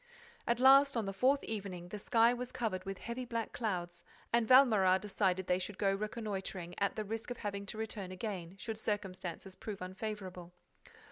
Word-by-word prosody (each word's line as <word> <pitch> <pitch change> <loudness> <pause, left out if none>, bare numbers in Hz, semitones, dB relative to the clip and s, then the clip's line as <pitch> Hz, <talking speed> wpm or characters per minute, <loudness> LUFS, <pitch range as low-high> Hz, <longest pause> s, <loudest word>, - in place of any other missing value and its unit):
At 235 0 +2
last, 275 +1 +7
on 225 - 0
the 195 - -3
fourth 265 +7 +3
evening, 190 -5 -5
the 210 - -5
sky 230 +3 +4
was 250 0 -5
covered 205 -7 -2
with 195 0 -4
heavy 235 +5 -5
black 230 -2 -3
clouds 175 -6 -3 0.3
and 235 -1 +3
Valméras 215 -8 +6
decided 190 -2 0
that 180 - +2
they 180 - +1
should 190 +1 -5
go 195 -1 +2
reconnoitring, 195 -4 -4
at 200 -1 +1
the 215 - -3
risk 225 +3 -4
of 245 - -4
having 200 -1 -4
to 215 - -4
return 210 -4 -4
again, 185 -3 -5
should 220 +1 -5
circumstances 190 -3 -4
prove 205 +1 -6
unfavorable. 185 -2 -6
205 Hz, 185 wpm, -34 LUFS, 185-230 Hz, 0.3 s, last